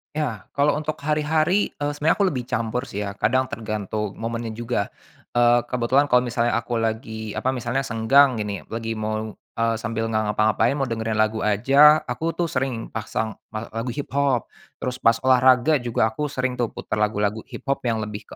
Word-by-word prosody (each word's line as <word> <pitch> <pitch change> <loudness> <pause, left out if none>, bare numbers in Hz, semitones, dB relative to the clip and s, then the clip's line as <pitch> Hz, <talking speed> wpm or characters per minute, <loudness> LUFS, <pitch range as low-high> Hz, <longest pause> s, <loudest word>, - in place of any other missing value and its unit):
Ya, 125 -10 -2
kalo 145 +1 +2
untuk 155 +1 -3
hari-hari, 155 +6 +1
eee, 145 0 -3
sebenarnya 155 +5 +1
aku 200 - +4
lebih 130 -8 -2
campur 120 +1 -2
sih 105 -7 -6
ya, 100 -1 -4
kadang 130 +5 +1
tergantung 105 -2 -3
momennya 115 0 -3
juga. 115 -2 -2 0.4
Eee, 120 0 +4
kebetulan 125 +4 +1
kalau 125 - +7
misalnya 120 -1 0
aku 120 +1 -4
lagi, 110 -1 -3
apa, 130 +5 -1
misalnya 120 +1 -1
senggang 135 +2 +4
gini, 105 -3 -3
lagi 115 0 -4
mau, 110 0 -3
eee, 115 +2 -2
sambil 115 -1 -2
nggak 110 0 +1
ngapa-ngapain 110 +4 +2
mau 140 - -1
dengerin 115 -3 -2
lagu 110 0 +1
aja, 140 +10 +5
aku 165 +1 -3
tuh 170 -2 -1
sering 130 -3 -2
pasang 110 0 -3 0.2
me 110 - -3
lagu 115 +2 -4
hiphop. 135 -1 -1 0.3
Terus 125 0 -3
pas 115 0 +4
olahraga 130 +3 +5
juga 115 -2 0
aku 150 +6 -2
sering 130 -3 -2
tuh 120 - +2
putar 110 - -3
lagu-lagu 105 0 0
hiphop 135 +1 -3
yang 110 -2 0
lebih 105 0 -7
120 Hz, 175 wpm, -23 LUFS, 110-135 Hz, 0.4 s, kalau